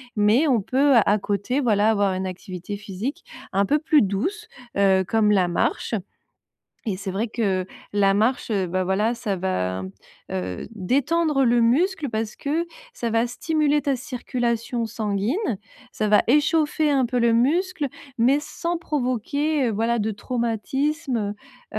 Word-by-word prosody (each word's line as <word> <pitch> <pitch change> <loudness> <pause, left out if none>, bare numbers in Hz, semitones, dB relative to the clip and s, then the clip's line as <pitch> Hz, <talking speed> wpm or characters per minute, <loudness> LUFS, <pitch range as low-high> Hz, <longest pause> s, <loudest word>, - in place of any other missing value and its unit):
Mais 215 +8 +4
on 255 -5 +3
peut 270 +7 +3
à 205 +1 +3
côté, 205 +7 -1
voilà, 220 -5 +3
avoir 200 -3 +1
une 190 +1 -3
activité 185 +1 -6
physique 210 - -5 0.3
un 200 +1 +3
peu 295 - +3
plus 305 0 +3
douce, 245 - -2 0.3
heu, 195 -1 +4
comme 220 -2 +2
la 185 -3 +3
marche 175 +6 -1 1.0
et 195 - -1
c'est 195 +1 -5
vrai 200 +5 -1
que 195 -5 -1 0.3
la 200 -1 +3
marche, 225 +5 +1
heu, 195 -3 +1
bah, 185 +1 0
voilà 205 +5 +1
ça 220 -4 -2
va 95 - -2
mmh, 95 - -6 0.4
heu, 90 - -4
détendre 275 - +1
le 240 0 +4
muscle 300 +7 +2
parce 220 -1 -3
que, 310 +4 -1 0.3
ça 235 - -3
va 230 +1 +2
stimuler 295 +3 0
ta 275 -2 +1
circulation 240 -3 -2
sanguine, 215 - -1 0.3
ça 215 - -1
va 210 0 +5
échauffer 300 +2 +3
un 270 -2 +3
peu 250 +1 -1
le 235 -1 +3
muscle, 300 +6 +1 0.3
mais 255 +5 +4
sans 335 +3 -3
provoquer, 285 0 -1
heu, - - 0
voilà 230 +3 0
de 215 0 -1
traumatisme, 240 +1 -2 0.4
heu - - -1
230 Hz, 155 wpm, -23 LUFS, 200-285 Hz, 1.0 s, va